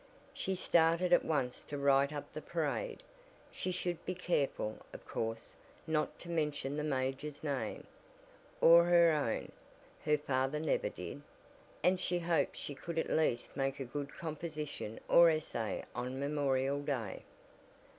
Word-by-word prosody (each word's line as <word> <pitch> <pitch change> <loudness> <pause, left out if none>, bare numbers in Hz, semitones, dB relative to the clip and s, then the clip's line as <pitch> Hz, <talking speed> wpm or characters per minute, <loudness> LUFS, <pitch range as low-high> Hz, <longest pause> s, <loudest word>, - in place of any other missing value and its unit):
She 190 - -2
started 170 0 +3
at - - +6
once 135 -6 -1
to 145 - -5
write 140 0 +4
up 145 -1 -6
the - - -5
parade. - - -2 0.5
She 185 - -3
should 175 -1 -2
be 185 - -3
careful, 145 -11 -1
of - - -10
course, 115 0 -4 0.3
not 155 -2 0
to - - -10
mention 150 -4 -1
the 150 - -2
major's 135 +1 -2
name, 145 -3 -3 0.8
or 170 +1 +8
her 170 -1 +6
own 145 -7 -1 0.5
(her 150 0 +3
father 135 0 0
never 155 - 0
did) - - -7 0.6
and 180 +1 +4
she 180 -1 0
hoped 170 -1 +1
she 145 - -5
could 165 +4 -6
at 160 - 0
least 150 -7 +1
make 135 0 -1
a 135 - -3
good 140 +3 -5
composition 155 -7 -5
or 170 0 +8
essay 155 -8 -2
on 130 +2 -4
Memorial 140 -1 +1
Day. 130 -9 -3
150 Hz, 145 wpm, -34 LUFS, 135-170 Hz, 0.8 s, or